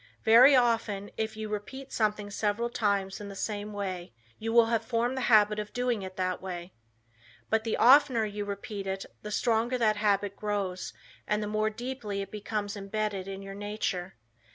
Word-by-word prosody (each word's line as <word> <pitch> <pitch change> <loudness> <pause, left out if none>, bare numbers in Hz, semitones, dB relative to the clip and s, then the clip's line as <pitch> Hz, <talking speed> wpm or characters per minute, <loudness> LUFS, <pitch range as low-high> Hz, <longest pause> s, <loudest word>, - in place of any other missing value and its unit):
Very 245 +5 +8
often, 225 -5 +1
if 220 0 -3
you 220 0 -4
repeat 235 +6 -6
something 210 -2 0
several 215 +3 -1
times 200 -3 0
in 205 - -7
the 200 - -8
same 210 +1 -3
way, 185 - -4 0.3
you 225 +1 -2
will 235 0 +6
have 230 0 0
formed 240 +1 0
the 260 - -2
habit 210 -2 +5
of 210 0 -6
doing 245 -3 0
it 185 -1 -7
that 185 -1 -1
way. 180 -1 -6 0.8
But 220 0 +2
the 225 - 0
oftener 255 -3 +6
you 205 0 -4
repeat 200 0 -5
it 190 0 -3 0.2
the 210 - -6
stronger 235 +3 +1
that 215 -3 +2
habit 205 -1 +1
grows 200 -4 -3 0.4
and 210 0 0
the - - -3
more 215 +1 +1
deeply 220 -3 -4
it - - -11
becomes 210 0 -3
embedded 200 -1 -3
in 195 0 -6
your 195 0 -7
nature. 200 -3 -3
210 Hz, 180 wpm, -29 LUFS, 200-225 Hz, 0.8 s, Very